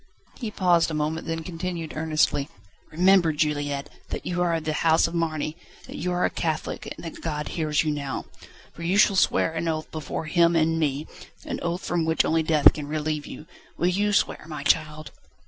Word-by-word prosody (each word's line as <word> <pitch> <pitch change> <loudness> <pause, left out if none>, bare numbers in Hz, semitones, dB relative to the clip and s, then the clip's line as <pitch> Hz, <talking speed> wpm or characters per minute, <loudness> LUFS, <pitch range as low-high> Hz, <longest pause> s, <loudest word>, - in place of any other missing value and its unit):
He 230 - -3
paused 180 -5 +3
a 160 - -3
moment, 155 +2 -2
then 165 0 -3
continued 170 -1 -5
earnestly: 155 -2 +1 0.4
"Remember, 180 0 +4
Juliette, 145 -2 -1 0.2
that - - -5
you 175 0 -1
are 175 -1 +2
of 160 - -3
the 155 - -1
house 160 +1 +3
of 165 - -3
Marny, 155 -2 -1 0.3
that - - -10
you 180 +2 -2
are 180 0 +1
a - - 0
Catholic, 160 -2 -3
and - - -9
that 165 - -8
God 150 -2 -3
hears 155 -3 0
you 155 - 0
now. 140 -2 -4 0.5
For - - -11
you 175 +4 +1
shall 205 -1 +5
swear 165 - +2
an 165 +1 -2
oath 155 -1 -2
before 155 0 -4
Him 170 +1 +3
and 165 0 +2
me, 145 -1 0 0.4
an - - -4
oath 175 +1 -3
from 175 -1 0
which 160 0 +2
only 160 0 +2
death 155 -2 +5
can 150 -2 -6
relieve 150 0 -2
you. 150 - -9 0.3
Will 175 - +2
you 205 +3 +1
swear, 200 - +1
my 150 -3 -6
child?" 155 +1 +1
160 Hz, 200 wpm, -25 LUFS, 155-170 Hz, 0.5 s, shall